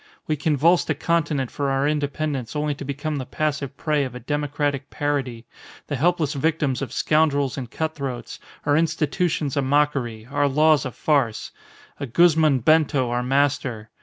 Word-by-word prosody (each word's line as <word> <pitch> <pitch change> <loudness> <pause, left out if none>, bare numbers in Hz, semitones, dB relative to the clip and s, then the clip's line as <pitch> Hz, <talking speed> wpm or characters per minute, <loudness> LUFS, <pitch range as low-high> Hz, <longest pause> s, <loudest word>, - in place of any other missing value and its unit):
We 155 - 0
convulsed 155 +4 +2
a 155 - +1
continent 150 -4 0
for 140 -1 -2
our 135 +1 +1
independence 145 -4 -2
only 150 0 0
to 145 - -8
become 145 +2 -3
the 130 - -4
passive 145 -3 -2
prey 150 -2 0
of 130 -2 -5
a - - -6
democratic 145 +1 -2
parody, 135 -6 -2 0.4
the 145 - -3
helpless 160 +1 +1
victims 145 -2 0
of 130 -4 -4
scoundrels 145 -2 +1
and 125 -4 -6
cut 160 +5 -3
throats, 130 -5 -6 0.3
our 145 0 +3
institutions 160 -1 0
a 140 - +2
mockery, 135 -5 0
our 145 0 +2
laws 150 0 +3
a - - -6
farce 130 -6 0 0.5
a 140 - -4
Guzman 155 -1 +4
Bento 145 -3 +3
our 120 0 0
master! 130 -4 0
145 Hz, 165 wpm, -23 LUFS, 135-155 Hz, 0.5 s, Guzman